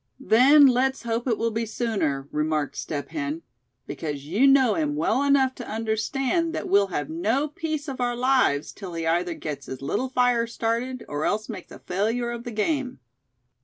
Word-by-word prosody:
"Then 275 Hz, +3 st, +6 dB
let's 265 Hz, 0 st, +2 dB
hope 235 Hz, +2 st, -2 dB
it 230 Hz, -4 st, +1 dB
will 230 Hz, 0 st, 0 dB
be 225 Hz, +1 st, -2 dB
sooner," 195 Hz, -, -1 dB
remarked 150 Hz, -1 st, -1 dB
Step 145 Hz, -3 st, -4 dB
Hen; 155 Hz, +1 st, -4 dB, 0.4 s
"because 145 Hz, -1 st, -5 dB
you 205 Hz, -, +3 dB
know 270 Hz, -4 st, +5 dB
him 300 Hz, -2 st, -1 dB
well 270 Hz, -4 st, +1 dB
enough 280 Hz, -2 st, +3 dB
to 245 Hz, -, -9 dB
understand 260 Hz, +10 st, -1 dB
that -, -, -3 dB
we'll 200 Hz, 0 st, +4 dB
have 145 Hz, -6 st, -3 dB
no 220 Hz, -, 0 dB
peace 310 Hz, 0 st, -4 dB
of 265 Hz, -2 st, -5 dB
our 245 Hz, 0 st, 0 dB
lives 250 Hz, -, +2 dB
till 185 Hz, -4 st, -8 dB
he 165 Hz, -1 st, -3 dB
either 170 Hz, +1 st, 0 dB
gets 145 Hz, -4 st, -6 dB
his 130 Hz, -, -6 dB
little 255 Hz, -, -1 dB
fire 245 Hz, -2 st, +2 dB
started, 235 Hz, +2 st, -2 dB
or 145 Hz, +1 st, -3 dB
else 215 Hz, +5 st, -1 dB
makes 200 Hz, -6 st, -8 dB
a -, -, -9 dB
failure 225 Hz, +6 st, -1 dB
of 235 Hz, +1 st, -6 dB
the 240 Hz, -, -5 dB
game." 255 Hz, -, -1 dB
230 Hz, 185 wpm, -25 LUFS, 170-260 Hz, 0.4 s, Then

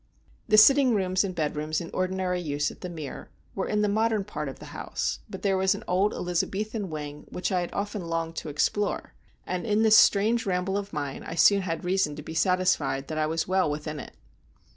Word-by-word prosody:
The 215 Hz, -, +4 dB
sitting 260 Hz, +2 st, +7 dB
rooms 185 Hz, -1 st, +1 dB
and 185 Hz, -2 st, -4 dB
bedrooms 155 Hz, 0 st, -1 dB
in 170 Hz, -, -7 dB
ordinary 185 Hz, -1 st, -1 dB
use 145 Hz, -3 st, -1 dB
at -, -, -15 dB
The 180 Hz, -, -5 dB
Mere 155 Hz, -5 st, -7 dB, 0.2 s
were 195 Hz, -, -2 dB
in 210 Hz, 0 st, +1 dB
the -, -, +3 dB
modern 215 Hz, 0 st, +1 dB
part 150 Hz, -7 st, -5 dB
of 135 Hz, -, -9 dB
the -, -, -11 dB
house; -, -, -3 dB
but -, -, -8 dB
there 195 Hz, -1 st, +2 dB
was 190 Hz, +1 st, +3 dB
an -, -, -8 dB
old 190 Hz, +3 st, +2 dB
Elizabethan 195 Hz, +4 st, -2 dB
wing 150 Hz, -1 st, -7 dB
which 180 Hz, +3 st, -3 dB
I 180 Hz, -1 st, +2 dB
had 175 Hz, -, -4 dB
often 205 Hz, -2 st, -3 dB
longed 165 Hz, 0 st, -2 dB
to 155 Hz, -, -4 dB
explore, 200 Hz, +8 st, -1 dB, 0.3 s
and 180 Hz, -1 st, -3 dB
in 215 Hz, -1 st, +2 dB
this 220 Hz, -1 st, +6 dB
strange 220 Hz, +3 st, +4 dB
ramble 185 Hz, +1 st, 0 dB
of 200 Hz, 0 st, -3 dB
mine 145 Hz, -3 st, -4 dB
I 165 Hz, -, -6 dB
soon 200 Hz, +4 st, +5 dB
had 170 Hz, -2 st, -4 dB
reason 180 Hz, -5 st, +1 dB
to 150 Hz, -, -8 dB
be 160 Hz, -, -7 dB
satisfied 160 Hz, -6 st, +1 dB
that 155 Hz, -1 st, -2 dB
I 155 Hz, -, +1 dB
was 160 Hz, +1 st, -1 dB
well 185 Hz, -3 st, +2 dB
within 150 Hz, 0 st, -4 dB
it. -, -, -10 dB
180 Hz, 215 wpm, -27 LUFS, 155-200 Hz, 0.3 s, sitting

